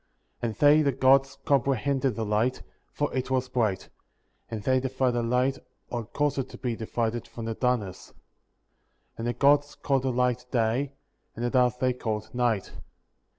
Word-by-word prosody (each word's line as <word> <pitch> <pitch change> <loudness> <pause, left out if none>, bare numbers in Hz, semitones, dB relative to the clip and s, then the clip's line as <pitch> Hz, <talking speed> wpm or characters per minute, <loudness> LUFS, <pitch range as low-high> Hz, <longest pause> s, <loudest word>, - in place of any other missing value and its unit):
4. 120 - -1
And 110 - -6
they 150 +1 +6
(the 140 -2 +2
Gods) 135 +1 +3
comprehended 135 -1 +1
the 115 - -2
light, 110 +5 0 0.3
for 145 - -2
it 130 0 -2
was 130 -1 0
bright; 110 -7 0 0.6
and 110 -3 -5
they 130 +3 +3
divided 130 0 0
the 120 - 0
light, 125 +3 +1 0.3
or 120 -2 -3
caused 145 +4 -1
it 130 -1 -3
to - - -10
be 120 -3 -2
divided, 115 +1 -2
from 115 - -8
the 115 - -2
darkness. 110 -6 -1
5. - - -24 1.0
And 115 - -2
the 120 - 0
Gods 145 +3 +3
called 135 -2 0
the 130 0 0
light 125 0 0
Day, 125 +4 0 0.4
and 120 - -3
the 120 - 0
darkness 125 -1 +2
they 130 -1 +2
called 110 -3 -4
Night. 120 -5 0
125 Hz, 180 wpm, -27 LUFS, 115-135 Hz, 1.0 s, they